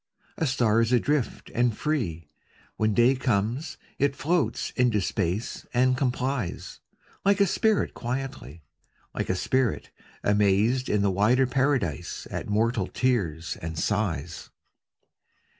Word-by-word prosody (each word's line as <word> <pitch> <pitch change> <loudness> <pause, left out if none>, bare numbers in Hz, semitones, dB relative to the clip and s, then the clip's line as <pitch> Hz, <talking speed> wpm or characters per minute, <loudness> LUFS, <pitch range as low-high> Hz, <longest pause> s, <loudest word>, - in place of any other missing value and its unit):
A 160 - 0
star 115 -4 +2
is 115 +1 +1
adrift 130 +2 0
and 120 -2 +1
free. 90 - -2 0.5
When 110 -1 +1
day 120 +2 +5
comes, 125 - -1 0.2
it 140 0 +2
floats 165 +4 0
into 125 -4 +2
space 95 +3 -2
and 130 +1 +4
com 130 -1 +1
plies; 130 -6 -3 0.4
Like 200 +1 +3
a 200 - +6
spirit 215 +3 +1
quietly, 120 - -5 0.5
Like - - -3
a 95 - +1
spirit, 130 +4 0 0.3
amazed 105 +5 +2
in 100 -1 +2
a 100 - +3
wider 115 +7 +3
paradise 130 - -1
At - - -4
mortal 110 -1 +1
tears 90 -11 -1
and 80 0 -5
sighs. 100 0 -2
120 Hz, 125 wpm, -26 LUFS, 100-130 Hz, 0.5 s, a